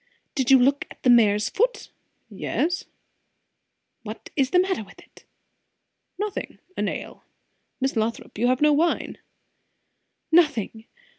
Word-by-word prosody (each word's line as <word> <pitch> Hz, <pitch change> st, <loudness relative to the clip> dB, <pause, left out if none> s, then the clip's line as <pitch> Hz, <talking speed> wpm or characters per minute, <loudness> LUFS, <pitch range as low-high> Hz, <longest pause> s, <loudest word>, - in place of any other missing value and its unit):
"Did 265 Hz, -2 st, -1 dB
you 270 Hz, -, +8 dB
look 275 Hz, +3 st, +2 dB
at -, -, -15 dB
the 250 Hz, -, +5 dB
mare's 210 Hz, -3 st, +4 dB
foot?" -, -, -1 dB, 0.4 s
"Yes." 345 Hz, +2 st, -2 dB, 1.2 s
"What 220 Hz, -1 st, -9 dB
is 270 Hz, -3 st, +2 dB
the 360 Hz, -, +2 dB
matter 370 Hz, -, +1 dB
with 200 Hz, -, -17 dB
it?" -, -, -19 dB, 0.9 s
"Nothing 415 Hz, 0 st, -4 dB, 0.2 s
a -, -, -3 dB
nail -, -, -4 dB, 0.6 s
Miss 265 Hz, 0 st, -1 dB
Lothrop, 225 Hz, +1 st, -2 dB
you 240 Hz, -, +2 dB
have 255 Hz, +2 st, +1 dB
no 300 Hz, 0 st, +5 dB
wine." 330 Hz, +4 st, 0 dB, 1.1 s
"Nothing! 265 Hz, -, +2 dB
265 Hz, 130 wpm, -24 LUFS, 230-330 Hz, 1.2 s, you